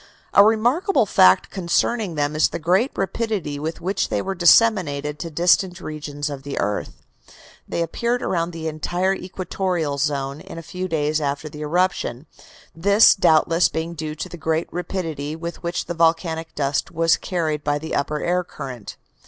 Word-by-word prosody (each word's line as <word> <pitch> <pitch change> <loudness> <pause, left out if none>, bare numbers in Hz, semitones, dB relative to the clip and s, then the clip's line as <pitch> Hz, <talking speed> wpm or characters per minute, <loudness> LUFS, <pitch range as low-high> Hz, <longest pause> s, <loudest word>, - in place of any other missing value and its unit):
A 200 - +8
remarkable 240 - +3
fact 95 - +4
concerning 190 +1 0
them 145 0 -1
is 155 - +3
the - - -4
great 185 - +2
rapidity 195 -7 -2
with 160 +2 -4
which 190 +3 -1
they 105 - 0
were 195 - -2
disseminated 175 -6 +3
to 170 - -5
distant 175 +3 +2
regions 145 -2 -5
of 140 -2 -5
the 140 0 -6
earth. 105 +1 -3 0.6
They 170 - -1
appeared 235 +8 -1
around 170 -1 0
the 165 -2 -5
entire 175 +5 -1
equatorial 180 -5 -3
zone 140 -1 -1
in - - -10
a 165 - -7
few 185 +3 -5
days 155 -2 0
after 145 +1 -2
the 150 +1 -10
eruption, 160 -5 -1 0.5
this 200 +6 +6
doubtless 165 -1 +3
being 160 +1 -3
due 155 -2 -5
to - - -5
the 175 - -9
great 160 +1 -1
rapidity 165 -5 -4
with 170 +1 -7
which 170 +1 -3
the 175 - -4
volcanic 165 -1 0
dust 140 -1 -1
was 165 0 +3
carried 155 -4 -2
by 145 0 +1
the 160 +2 -6
upper 150 +2 -1
air 180 +1 +1
current. 125 - -8
165 Hz, 170 wpm, -22 LUFS, 150-180 Hz, 0.6 s, A